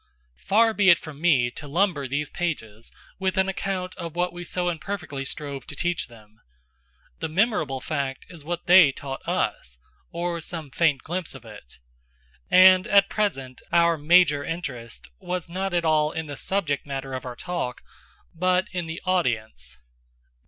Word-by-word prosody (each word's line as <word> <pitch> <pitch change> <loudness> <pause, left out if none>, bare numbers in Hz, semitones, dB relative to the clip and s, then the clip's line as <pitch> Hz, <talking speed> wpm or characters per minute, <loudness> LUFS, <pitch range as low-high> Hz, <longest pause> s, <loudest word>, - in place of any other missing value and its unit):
Far 225 +2 +3
be 205 -3 +4
it 170 - +8
from 155 -3 -11
me 135 -8 +3
to 145 - -9
lumber 160 -3 +1
these 145 +3 -3
pages 115 -11 -4 0.3
with 190 0 -1
an 190 0 +3
account 190 -1 -3
of 170 -2 -6
what 175 0 0
we 175 0 -7
so 180 +1 -2
imperfectly 165 -5 -4
strove 140 -1 -6
to - - -6
teach 175 -2 -1
them. 110 -3 -18 0.8
The - - -3
memorable 160 - +1
fact 140 -2 -3
is 170 -5 -12
what 170 +2 -4
they 180 -5 +8
taught 135 0 -7
us, - - -2 0.3
or 170 0 -3
some 160 -4 -7
faint 150 -3 +2
glimpse 175 -3 -4
of 125 -3 -12
it. 105 - -13 0.7
And 185 0 +7
at 200 0 +5
present, 135 -12 -2
our 170 0 +4
major 150 -1 +4
interest 130 -8 -6
was 180 -2 -4
not 190 +3 -3
at 175 -1 0
all 155 -1 +3
in 160 0 -4
the 145 -1 -7
subject 155 -5 -1
matter 135 -1 -5
of 130 - -4
our 125 -1 -6
talk, 170 -6 -4 0.5
but 185 +2 +1
in 180 -3 -3
the 160 +1 -6
audience. 110 - -1
165 Hz, 165 wpm, -25 LUFS, 135-180 Hz, 0.8 s, it